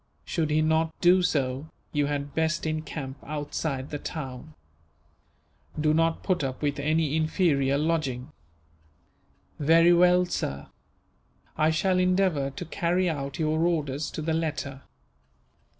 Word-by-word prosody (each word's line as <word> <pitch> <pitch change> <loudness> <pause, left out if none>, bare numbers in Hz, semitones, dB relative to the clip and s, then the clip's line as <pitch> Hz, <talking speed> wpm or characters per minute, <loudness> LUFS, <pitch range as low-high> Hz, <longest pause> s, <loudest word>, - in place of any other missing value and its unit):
Should 160 -3 -1
he 155 +1 +2
not 160 0 +1
do 180 +1 +5
so, 140 -4 -1 0.2
you 145 -2 +1
had 145 -1 -3
best 160 +1 0
encamp 155 -3 -4
outside 145 -2 -4
the 145 - -3
town. 140 -1 -7 1.2
Do 155 0 +3
not 165 +1 +1
put 185 -6 0
up 130 +1 -4
with 145 -1 0
any 155 0 +1
inferior 155 -4 +2
lodging." 150 -4 -1 1.3
"Very 165 +3 +5
well, 180 +1 +5
sir; 70 - -3 0.9
I 155 0 +3
shall 185 +4 +1
endeavour 180 -6 +2
to 140 +6 -7
carry 175 +2 0
out 140 -2 -5
your 155 -1 0
orders, 150 -4 0
to 155 - -4
the 160 +1 0
letter." 150 -4 -3
155 Hz, 130 wpm, -27 LUFS, 140-165 Hz, 1.3 s, do